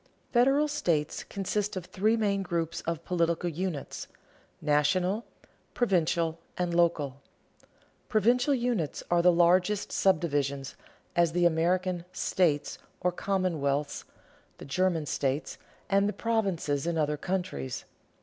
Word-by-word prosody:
Federal 270 +5 +4
states 170 - -1
consist 200 +1 -2
of 185 -2 -4
three 215 +5 +1
main 200 -3 +1
groups 170 -3 -2
of 165 -1 -2
political 170 -1 0
units: 170 -2 -4 0.5
national, 180 +8 +1 0.5
provincial, 170 -6 +1 0.2
and 175 -1 -1
local. 150 -6 +1 0.9
Provincial 245 +5 +3
units 235 - -1
are 175 0 +4
the 180 +1 +6
largest 180 +4 +3
subdivisions, 145 -7 +1 0.4
as 170 -2 +3
the 175 0 +2
American 175 +2 +1
"states," 155 -8 0 0.2
or 180 - +2
commonwealths, 160 -7 -1 0.5
the - - -10
German 165 +2 +1
states, 140 0 -2 0.3
and 200 +1 +3
the - - -3
provinces 190 -10 -1
in 170 -1 0
other 150 -1 +1
countries. 175 -6 -3
175 Hz, 115 wpm, -29 LUFS, 155-195 Hz, 0.9 s, the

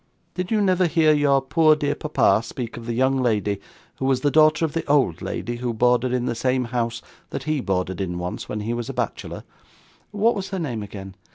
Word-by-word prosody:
Did 180 0 -3
you 220 -2 +2
never 185 -2 +3
hear 160 -1 +4
your 140 -2 +3
poor 155 +2 +4
dear 145 -1 -1
papa 110 -9 +2
speak 115 +1 -6
of 115 0 -9
the 120 - -2
young 130 +2 +2
lady 105 -4 0 0.4
who 130 - -3
was 130 -1 +2
the 145 - +2
daughter 155 +1 +5
of 155 - -4
the 165 - -1
old 140 - +2
lady 120 0 -4
who 120 -1 -3
boarded 125 +2 +2
in 125 -1 0
the 120 - 0
same 130 +2 0
house 115 -1 -2 0.3
that 135 - -5
he 155 0 0
boarded 95 -4 -2
in 90 -2 -3
once, 90 +1 -5
when 105 - -3
he 115 +3 -2
was 120 -1 -4
a - - -4
bachelor - - -4 0.7
what 215 +3 +2
was 195 -2 -4
her 195 - -3
name 130 -11 -3
again? 95 -2 -8
130 Hz, 220 wpm, -23 LUFS, 115-155 Hz, 0.7 s, daughter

